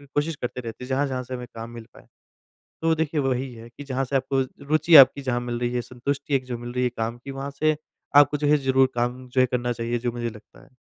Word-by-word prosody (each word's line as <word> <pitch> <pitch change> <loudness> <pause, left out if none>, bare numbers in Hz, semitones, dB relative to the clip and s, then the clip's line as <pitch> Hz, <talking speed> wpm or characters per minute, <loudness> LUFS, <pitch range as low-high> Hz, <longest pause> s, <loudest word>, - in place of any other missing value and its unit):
कोशिश 150 +2 0
करते 125 -1 -5
रहते 115 +1 -7
हैं - - -12
जहाँ-जहाँ 130 -1 0
से 130 +1 -8
हमें 125 0 -7
काम 115 +1 -6
मिल 115 -1 -9
पाए। - - -17 0.7
तो 165 0 +3
देखिए 160 -1 -1
वही 130 -1 -1
है 115 0 -11
कि 145 - -11
जहाँ 135 -1 -2
से 135 - -4
आपको 135 0 +1 0.3
रुचि 155 +2 +4
आपकी 140 +1 +3
जहाँ 125 -2 -1
मिल 120 -1 -3
रही 120 0 -1
है 120 - 0
संतुष्टि 140 +4 -3
एक 130 -1 0
जो 125 -2 -4
मिल 120 +1 -7
रही 125 0 0
है 125 - +2
काम 115 +1 -2
की 140 - -5
वहाँ 135 +1 -5
से 155 0 +3 0.4
आपको 145 0 +6
जो 145 0 0
है 150 0 +5
ज़रूर 130 0 +4
काम 125 +1 -2
जो 130 +1 +2
है 130 - +4
करना 120 -1 0
चाहिए 120 +1 -2
जो 120 0 -1
मुझे 120 0 -3
लगता 110 -1 -15
है। - - -21
130 Hz, 260 wpm, -24 LUFS, 120-140 Hz, 0.7 s, आपको